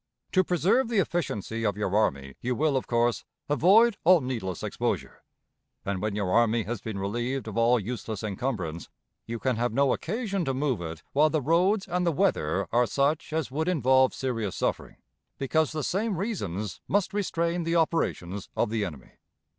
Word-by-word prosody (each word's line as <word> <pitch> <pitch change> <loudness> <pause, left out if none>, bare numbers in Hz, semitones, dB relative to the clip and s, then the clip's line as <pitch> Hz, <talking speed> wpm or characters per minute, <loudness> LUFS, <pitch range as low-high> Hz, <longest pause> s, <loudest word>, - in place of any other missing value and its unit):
To 185 - +4
preserve 180 +8 +2
the 230 - 0
efficiency 115 - -1
of 105 -2 0
your 105 -2 -1
army, 70 -10 +1
you 125 +1 -1
will, 150 +1 +1
of 130 - -1
course, 120 0 +1 0.2
avoid 200 +9 +5
all 180 +1 +7
needless 115 - -4
exposure; - - -3 0.6
and, 95 -2 -2
when 105 -1 -1
your 100 -3 -1
army 115 +1 +3
has 110 +1 -4
been 110 -3 -5
relieved 120 +6 -2
of 110 - -6
all 115 +1 +4
useless 110 -1 -5
encumbrance, 100 -7 -3 0.4
you 115 +1 -3
can 125 0 -1
have 120 +1 0
no 135 +3 +3
occasion 200 -1 -2
to 135 -1 -1
move 130 -7 0
it 80 -1 -6
while 150 +3 +4
the 155 - +1
roads 180 - +2
and 180 0 0
the 170 - +2
weather 100 - +1
are 120 +1 +3
such 145 +3 0
as 155 -4 -2
would 160 +4 -1
involve 130 -6 +4
serious 115 -8 -2
suffering, - - -2 0.4
because 155 +3 +1
the 155 -1 -3
same 200 +3 -1
reasons 110 - -3
must 200 0 +1
restrain 170 -4 -1
the 165 +1 0
operations 100 - 0
of - - +1
the 110 -2 0
enemy.... 75 -9 -7
130 Hz, 180 wpm, -27 LUFS, 105-165 Hz, 0.6 s, all